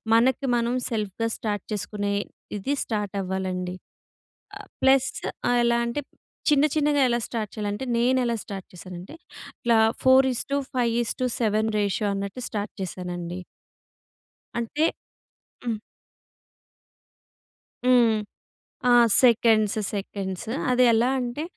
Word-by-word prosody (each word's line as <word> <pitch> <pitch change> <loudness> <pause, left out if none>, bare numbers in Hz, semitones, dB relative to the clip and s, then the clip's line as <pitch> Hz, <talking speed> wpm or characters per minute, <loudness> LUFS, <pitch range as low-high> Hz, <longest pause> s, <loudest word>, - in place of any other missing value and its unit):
మనకి 260 +3 +3
మనం 235 +1 0
సెల్ఫ్‌గా 220 0 -2
స్టార్ట్ 205 -3 -3
చేసుకునే 205 +1 -2 0.4
ఇది 270 +9 -1
స్టార్ట్ 210 -3 -3
అవ్వాలండి. 185 -1 -3 0.8
ఆహ్, - - -12
ప్లస్ 265 0 +4 0.4
ఆహ్, 245 - +3
ఎలా 235 0 +3
అంటే 235 +5 -2 0.5
చిన్న 295 -1 +5
చిన్నగా 295 -1 +2
ఎలా 240 0 +1
స్టార్ట్ 220 -3 -3
చేయాలంటే, 210 +3 -3
నేను 255 +2 +3
ఎలా 235 -1 0
స్టార్ట్ 195 -2 -7
చేసానంటే, 180 - -9 0.5
ఇలా 235 -2 +4 0.2
4:5:7 250 -4 +1
రేషియో 205 +1 0
అన్నట్టు 200 +5 -4
స్టార్ట్ 205 -1 -3
చేసానండి. 180 -1 -5 1.2
అంటే 290 +7 0 0.8
హ్మ్. 225 -3 -2 2.1
హ్మ్. 240 -3 +5 0.7
ఆ! - - +6 0.3
Seconds 225 -3 +4 0.2
seconds. 195 0 -4 0.2
అది 250 0 +4
ఎలా 230 +2 +3
అంటే, 245 +4 -3
230 Hz, 105 wpm, -25 LUFS, 200-250 Hz, 2.1 s, ఆ